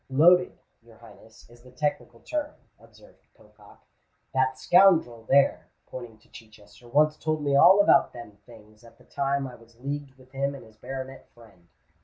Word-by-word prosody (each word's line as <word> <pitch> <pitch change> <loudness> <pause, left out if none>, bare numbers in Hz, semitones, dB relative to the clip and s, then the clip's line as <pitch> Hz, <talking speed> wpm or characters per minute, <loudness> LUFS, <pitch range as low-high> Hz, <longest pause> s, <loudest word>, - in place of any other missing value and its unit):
"Loaded, 175 +7 +3 0.2
your 115 -1 -20
Highness, 110 0 -18
is 120 0 -20
the 125 - -17
technical 125 -3 -4
term, 300 -1 -5 0.2
observed - - -22
Pocock. - - -21 0.5
"That 130 0 0
scoundrel 160 -11 +3
there," 140 0 +2 0.2
pointing 120 -3 -10
to - - -28
Chichester, 110 -1 -17
"once 150 +4 +2
told 155 -1 -3
me 140 -1 0
all 180 +7 +6
about 200 - +3
them 120 -3 -11
things, 110 -1 -18
at 115 - -18
the - - -22
time 140 0 -2
I 130 - -9
was 115 0 -19
leagued 140 0 -6
with 130 -1 -22
him 140 +1 -3
and 135 - -12
his 110 -1 -21
baronet 135 +2 -9
friend." 100 -7 -20
130 Hz, 170 wpm, -25 LUFS, 115-145 Hz, 0.5 s, all